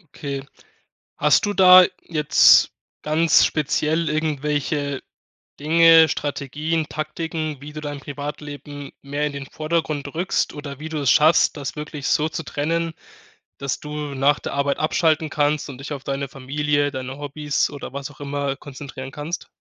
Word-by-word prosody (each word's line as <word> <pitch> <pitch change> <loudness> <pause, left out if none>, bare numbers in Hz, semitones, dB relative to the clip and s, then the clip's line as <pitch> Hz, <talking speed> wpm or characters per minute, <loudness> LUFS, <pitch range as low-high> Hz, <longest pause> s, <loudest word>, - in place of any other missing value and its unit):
Okay. 140 -1 -5 0.7
Hast - - +3
du 205 - -1
da 185 -1 +9 0.2
jetzt 155 -3 +5 0.3
ganz 155 +1 +4
speziell 155 +2 0
irgendwelche 150 -2 -1 0.6
Dinge, 165 +1 +6
Strategien, 150 +2 -2
Taktiken, 155 -1 -4
wie 150 +1 -9
du 155 - -6
dein 145 -1 -5
Privatleben 145 0 -7
mehr 145 +2 -2
in 145 - -6
den 140 -1 -6
Vordergrund 155 -2 -2
rückst 180 +3 0
oder 145 -2 -8
wie 160 +1 -6
du 155 - -4
es 140 -4 +2
schaffst, 155 0 +4
das 140 -2 -5
wirklich 150 -2 -5
so 155 +1 +2
zu 160 - -5
trennen, 165 +2 -2 0.7
dass 140 -1 -3
du 150 0 -7 0.2
nach 140 +2 +3
der - - -6
Arbeit 140 0 0
abschalten 155 0 +1
kannst 150 0 0
und 130 - -9
dich 135 +2 -7
auf 135 -2 -6
deine 140 0 -3
Familie, 145 +2 -1
deine 130 0 -6
Hobbys 145 0 -1
oder 145 -3 -8
was 140 +1 -6
auch 145 - -18
immer 140 -1 -2
konzentrieren 135 -2 -9
kannst? 150 +5 -5
150 Hz, 155 wpm, -22 LUFS, 140-155 Hz, 0.7 s, da